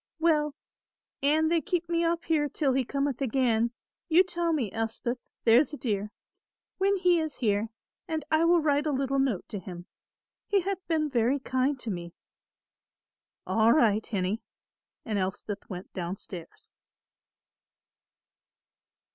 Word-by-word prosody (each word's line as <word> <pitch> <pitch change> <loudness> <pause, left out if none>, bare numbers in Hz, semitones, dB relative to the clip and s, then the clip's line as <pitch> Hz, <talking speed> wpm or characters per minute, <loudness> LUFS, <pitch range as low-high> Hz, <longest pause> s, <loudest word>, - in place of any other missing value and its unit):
"Well, 305 -3 +2 0.7
an 310 +3 +3
they 335 -1 +2
keep 345 +3 -1
me 335 0 +1
up 335 0 0
here 300 -3 +1
till 275 -1 +1
he 265 0 +2
cometh 275 +1 -2
again, 235 -3 +2 0.4
you 340 +3 +6
tell 345 -2 -1
me, 255 - 0
Elspeth, 225 +2 -2 0.2
there's 245 +7 +5
a - - -4
dear, 210 -5 -2 0.7
when 395 +1 +3
he 360 -2 +3
is 315 -2 -3
here; 210 -2 0 0.4
and 315 -3 -3
I 315 +1 +4
will 345 +1 +5
write 295 0 +2
a - - +1
little 275 0 0
note 260 -9 0
to 205 - -4
him. 175 -1 -9 0.6
He 400 -1 +3
hath 390 +1 -2
been 315 -2 +1
very 245 +2 +2
kind 260 +1 0
to 225 - -3
me." 170 -2 -6 1.3
"All 225 +1 +4
right, 220 -7 +3
hinnie," 200 +1 -2 0.6
and 215 -4 -1
Elspeth 190 +2 -4
went 185 -1 -8
down 180 +1 -4
stairs. 175 -4 -10
270 Hz, 145 wpm, -28 LUFS, 220-315 Hz, 1.3 s, you